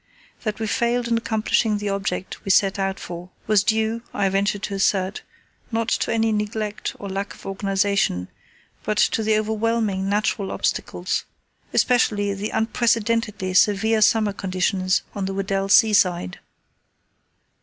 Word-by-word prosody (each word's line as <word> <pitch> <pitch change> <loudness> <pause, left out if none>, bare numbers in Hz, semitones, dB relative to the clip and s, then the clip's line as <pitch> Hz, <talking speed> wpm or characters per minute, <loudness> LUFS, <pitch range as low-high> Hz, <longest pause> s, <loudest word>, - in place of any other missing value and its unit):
That 215 -2 -3
we 220 - -1
failed 235 +2 0
in 230 - +2
accomplishing 220 -1 +1
the 205 0 -3
object 195 -2 -3
we - - -6
set 195 +1 +3
out 195 0 -1
for 175 +1 -8 0.2
was 210 -2 +3
due, 220 +1 0
I 200 -1 +2
venture 200 +2 +1
to 200 0 -5
assert, 195 0 0 0.5
not 225 0 -1
to - - 0
any 225 0 +2
neglect 210 0 -3
or 200 - -7
lack 195 +1 -4
of - - -16
organization, 195 - 0 0.5
but 215 - -2
to 225 - +2
the 215 0 +2
overwhelming 215 -2 0
natural 205 -1 0
obstacles, - - -2 0.5
especially 210 -5 +2
the 200 +2 -4
unprecedentedly 225 -3 0
severe 215 +3 +3
summer 215 -1 +3
conditions 185 -1 0
on 200 -2 -3
the 195 0 -3
Weddell 195 0 -1
Sea 215 +2 +6
side. 180 - +2
205 Hz, 145 wpm, -23 LUFS, 195-220 Hz, 0.5 s, Sea